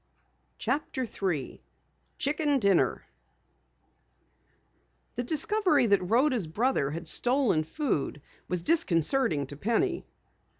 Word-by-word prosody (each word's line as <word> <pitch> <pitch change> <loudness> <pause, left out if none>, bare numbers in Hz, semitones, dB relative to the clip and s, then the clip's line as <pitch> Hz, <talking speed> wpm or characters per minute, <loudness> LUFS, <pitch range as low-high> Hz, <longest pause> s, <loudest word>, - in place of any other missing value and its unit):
CHAPTER 260 0 -2
3 180 - -4 0.6
CHICKEN 290 0 0
DINNER 200 -7 +1 2.1
The - - -3
discovery 315 - +2
that 200 -3 +3
Rhoda's 245 - +2
brother 210 - 0
had 165 +3 -6
stolen 245 - +2
food 155 - -3 0.3
was 180 -2 -2
disconcerting 180 - +2
to 145 - -10
Penny. 345 - -1
235 Hz, 90 wpm, -28 LUFS, -, 2.1 s, that